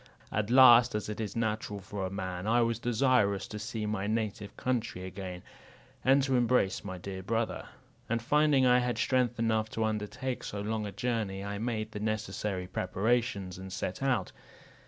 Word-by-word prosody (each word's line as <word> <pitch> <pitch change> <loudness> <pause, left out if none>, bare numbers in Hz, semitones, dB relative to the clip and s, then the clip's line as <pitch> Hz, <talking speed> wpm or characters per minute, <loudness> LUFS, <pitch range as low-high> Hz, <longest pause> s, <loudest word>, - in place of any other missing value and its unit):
At 105 0 -1
last, 120 -2 +8
as 105 -1 -3
it 105 - -5
is 105 - -4
natural 110 -2 -2
for 95 0 -4
a - - -5
man, 95 0 -4
I 120 +2 +4
was 115 -1 0
desirous 115 -5 +2
to 105 - -6
see 110 0 -4
my 105 -1 -2
native 105 -2 -3
country 120 -7 -2
again, 95 -1 -7 0.6
and 135 +1 +5
to 135 -1 +1
embrace 120 -5 +2
my 95 -2 -5
dear 95 +1 -6
brother; 115 +4 -2 0.4
and 115 +1 +1
finding 145 +2 +3
I 125 0 +6
had 125 -1 -1
strength 125 -2 +1
enough 110 -1 +1
to 110 - -2
undertake 110 +4 -3
so 100 - -5
long 105 +1 -2
a - - -5
journey, 105 -2 -2
I 100 0 -4
made 110 -1 -2
the 105 - -5
necessary 105 -3 -2
preparations, 100 +1 -1
and 95 0 -8
set 95 +2 -4
out. 125 -9 0
110 Hz, 175 wpm, -30 LUFS, 100-120 Hz, 0.6 s, last